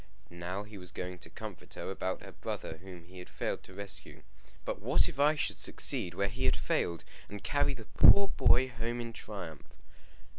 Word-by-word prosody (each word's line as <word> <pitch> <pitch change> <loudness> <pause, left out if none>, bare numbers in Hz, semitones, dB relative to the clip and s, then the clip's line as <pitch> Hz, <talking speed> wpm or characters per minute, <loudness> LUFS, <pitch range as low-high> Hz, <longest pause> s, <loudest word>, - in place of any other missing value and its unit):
Now 90 +3 -4
he 105 -1 -10
was 90 -1 -4
going 90 0 -5
to - - -7
comfort - - -9
her - - -4
about 95 -1 -2
her - - -9
brother 80 - -5
whom 90 -1 -10
he 90 +2 -12
had 90 - -9
failed - - -2
to 95 - -13
rescue; 100 0 -7 0.4
but - - -2
what - - +4
if 135 - -6
I 150 +2 +6
should 145 - -1
succeed 85 -1 +1
where 100 - +1
he 125 +6 -2
had - - +4
failed, 85 -2 0 0.3
and 105 0 -7
carry 145 -1 +2
the 115 -3 -9
poor 200 - +7
boy 130 +1 +4
home 120 0 -3
in 115 -1 -4
triumph! 90 -10 -7
100 Hz, 195 wpm, -32 LUFS, 90-120 Hz, 0.4 s, poor